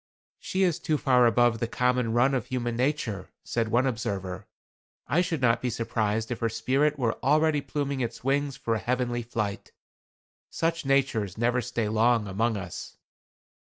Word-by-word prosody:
"She 190 +1 -1
is 175 -4 +1
too 155 - 0
far 125 -4 +4
above 115 0 +3
the 115 - -1
common 125 -1 +1
run 125 +3 +3
of 130 -5 -1
human 120 -3 -2
nature," 125 -6 -1
said 115 -1 -1
one 120 +4 +2
observer. 100 -7 -3 0.6
"I 170 - +2
should 170 -6 -2
not 115 -2 +3
be 125 - 0
surprised 110 -1 -1
if 120 - -3
her 115 - 0
spirit 140 +6 +1
were 120 -4 -1
already 150 +2 +3
pluming 140 -2 -3
its 115 -1 -4
wings 140 +1 0
for 115 -5 -1
a 110 - 0
heavenly 120 0 -1
flight. 110 -3 -4 0.8
Such 165 -2 -1
natures 125 -8 +1
never 120 +2 +1
stay 120 -3 -2
long 110 0 +2
among 110 +3 0
us." 95 -3 -7
120 Hz, 165 wpm, -27 LUFS, 115-135 Hz, 0.8 s, far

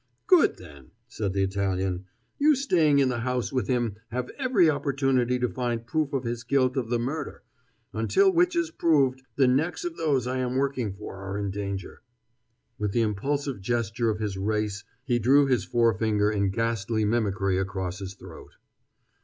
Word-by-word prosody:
"Good, 365 -6 +4
then," 70 -7 -14 0.2
said 105 -5 -3
the 95 0 +1
Italian; 95 -1 -1 0.3
"you 300 +1 +5
staying 170 - +3
in 135 -2 +4
the 120 -2 -2
house 125 +1 -2
with 125 -6 0
him 120 -5 0
have 125 +1 -4
every 255 - +3
opportunity 135 -4 +1
to 125 0 0
find 120 -2 -3
proof 155 +2 -1
of 135 -2 -1
his 120 0 -3
guilt 130 +1 +1
of 125 -4 -2
the 120 - +1
murder; 140 +5 -4 0.5
until 380 - +3
which 350 0 +3
is 340 -1 0
proved, 140 - +2
the 135 -2 +4
necks 155 - 0
of 345 -1 -4
those 140 -6 +1
I 130 +1 -2
am 125 0 -1
working 130 -5 0
for 100 -1 -8
are 95 +1 -5
in 100 -1 -2
danger." 100 -1 -5 0.8
With 105 -1 -1
the 120 - +2
impulsive 135 +3 -2
gesture 115 +1 -1
of 105 - -1
his 105 -3 -3
race 105 0 -1 0.2
he 120 -2 +1
drew 135 +5 +5
his 125 -8 +1
forefinger 110 -3 +2
in 100 -2 +1
ghastly 110 0 -1
mimicry 100 -4 0
across 95 -1 -3
his 95 -1 -7
throat. - - -13
120 Hz, 175 wpm, -26 LUFS, 100-140 Hz, 0.8 s, you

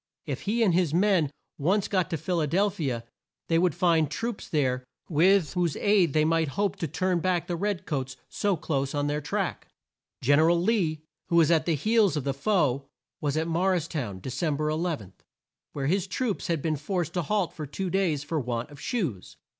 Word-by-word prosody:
If - - -4
he 230 +2 +2
and 190 -6 +3
his 170 -3 +2
men 185 -5 +3 0.3
once 190 +7 +2
got 185 -3 0
to 165 - -1
Phil 170 +3 -1
a 150 - +1
del 195 +7 +2
phi 165 - -4
a, 115 -2 -3 0.5
they 165 0 +4
would 175 -3 +2
find 165 -4 +3
troops 230 +6 -4
there 130 -4 +1 0.2
with 175 +1 +3
whose 175 -4 0
aid 200 -7 +3
they 155 0 +3
might 165 0 +2
hope 200 -2 +1
to 165 - -2
turn 180 +4 0
back 175 0 0
the 175 - -2
red 200 +1 -2
coats 135 -3 -3
so 200 -3 0
close 140 -3 -2
on 145 0 0
their 145 +1 -1
track. 145 - -2 0.6
Gen 145 +4 +5
er 160 +1 +5
al 170 0 +3
Lee, 170 -6 +1 0.2
who 170 - 0
was 165 -1 +5
at 160 -1 +2
the 165 - +3
heels 210 - +3
of 145 - -2
the 140 0 -1
foe, 140 -4 +1 0.3
was 145 0 -1
at 160 +1 0
Mor 180 +3 +2
ris 170 -3 -1
town, 120 - -4
De 130 - -5
cem 155 +2 0
ber 150 +1 0
11, 155 - -2 0.6
where 140 -2 -3
his 190 +5 +1
troops 215 +2 -2
had 165 -4 -1
been 155 -2 0
forced 170 +2 -2
to 180 - 0
halt 190 +2 0
for 155 -2 -6
two 180 +6 -4
days 175 -7 +1
for 155 +1 -2
want 120 +1 -3
of 145 0 -12
shoes. 160 - -3
165 Hz, 215 wpm, -27 LUFS, 145-185 Hz, 0.6 s, Gen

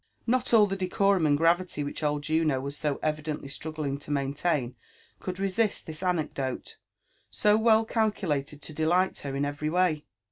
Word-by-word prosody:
Not 250 +1 +1
all 220 -3 +7
the 195 -1 -2
decorum 190 -2 +2
and 145 -1 +3
gravity 170 -1 +2
which 145 - -5
old 150 -1 0
Juno 155 -3 +1
was 140 +2 -5
so 150 -2 -1
evidently 150 -1 -2
struggling 145 0 -4
to 145 - -12
maintain 140 -2 -1 0.4
could 185 -1 -5
resist 195 +2 0
this 155 0 -8
anecdote, 155 -8 -2 0.5
so 210 0 +3
well 220 0 +4
calculated 165 - -1
to 155 - -6
delight 175 +5 +1
her 140 -1 -5
in 140 +1 0
every 145 +1 -2
way. 170 -3 +1
155 Hz, 165 wpm, -28 LUFS, 145-185 Hz, 0.5 s, all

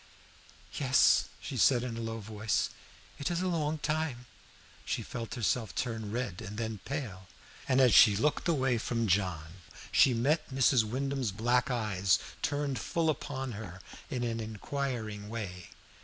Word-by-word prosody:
"Yes," 130 -3 +5
she - - -6
said 125 -3 +4
in 125 -2 -4
a 115 - -4
low 115 0 -3
voice, 110 0 -1 0.5
"it 140 - -1
is 175 -1 -1
a 185 - 0
long 160 -3 0
time." 150 -5 -2 0.6
She - - -2
felt 115 -1 -6
herself 115 -4 -1
turn 115 -4 -2
red 115 -6 -3
and 105 +3 -7
then 110 -2 -3
pale, 115 -10 -5 0.4
and 130 - +4
as 125 -5 +6
she 105 +1 +8
looked 150 - +1
away 135 -7 +2
from 115 0 -1
John 90 -3 -1 0.3
she 130 - +5
met 150 +7 +1
Mrs. 130 -3 +4
Wyndham's 130 +1 -2
black 120 +6 +1
eyes 100 - +2 0.2
turned 145 -2 -1
full 165 -2 +1
upon 135 -3 -4
her 100 -4 -8 0.3
in 125 -2 -2
an 115 -1 -1
inquiring 110 -1 -4
way. 95 -6 -6
120 Hz, 155 wpm, -31 LUFS, 105-135 Hz, 0.6 s, she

